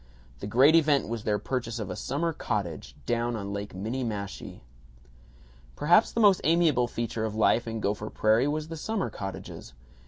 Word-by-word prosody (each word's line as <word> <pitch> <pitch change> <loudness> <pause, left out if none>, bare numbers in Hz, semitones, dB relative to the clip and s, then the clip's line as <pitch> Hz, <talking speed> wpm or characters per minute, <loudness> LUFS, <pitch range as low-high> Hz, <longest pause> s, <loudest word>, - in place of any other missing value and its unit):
The 100 - -5
great 130 +9 +5
event 150 -4 +3
was 115 -2 -4
their 105 -1 +1
purchase 120 -1 -3
of 105 -5 -4
a - - -4
summer 165 +5 -2
cottage, 95 - -4
down 120 0 0
on 100 -2 -5
Lake 100 -1 -5
Minniemashie. 105 -1 -4 1.1
Perhaps 175 +9 +4
the - - -2
most 205 -4 +5
amiable 155 -6 +3
feature 115 -1 -3
of 110 -1 -3
life 115 +2 +2
in 115 0 -3
Gopher 105 +1 -2
Prairie 110 +5 +2
was 155 +1 -2
the 165 - -6
summer 215 +4 -2
cottages. 95 -9 -7
120 Hz, 165 wpm, -27 LUFS, 105-150 Hz, 1.1 s, great